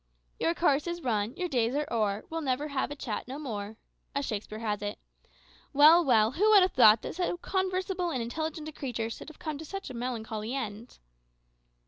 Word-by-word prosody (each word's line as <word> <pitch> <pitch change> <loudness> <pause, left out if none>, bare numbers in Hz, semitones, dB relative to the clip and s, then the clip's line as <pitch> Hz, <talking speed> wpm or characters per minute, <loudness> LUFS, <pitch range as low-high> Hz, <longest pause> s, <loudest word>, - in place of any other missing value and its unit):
"`Your 335 - +1
course 295 -2 +2
is 345 -1 -4
run, 220 0 0
your 360 0 -2
days 245 -4 0
are 295 +1 0
o'er; 210 -2 0
We'll 325 0 -4
never 285 +1 -1
have 275 -2 -1
a 290 - -5
chat 240 -6 -4
no 265 +2 -6
more,' 220 -7 -5 0.4
"As 280 0 0
Shakespeare 215 -2 -4
has 210 -2 -2
it. 205 0 -4 0.8
Well, 310 +5 +8
well, 225 -6 +4
who 405 +10 +2
would 410 -3 +8
have 370 - +2
thought 220 -3 +7
that - - -4
so 355 0 -1
conversable 375 -1 -1
and 265 - -2
intelligent 310 +6 -4
a - - -5
creature 240 -6 -4
should 230 - -8
have 315 - -14
come 310 -4 -5
to - - -6
such 390 -1 -6
a - - -7
melancholy 230 -1 -4
end?" 230 -2 -5
270 Hz, 200 wpm, -29 LUFS, 225-325 Hz, 0.8 s, Well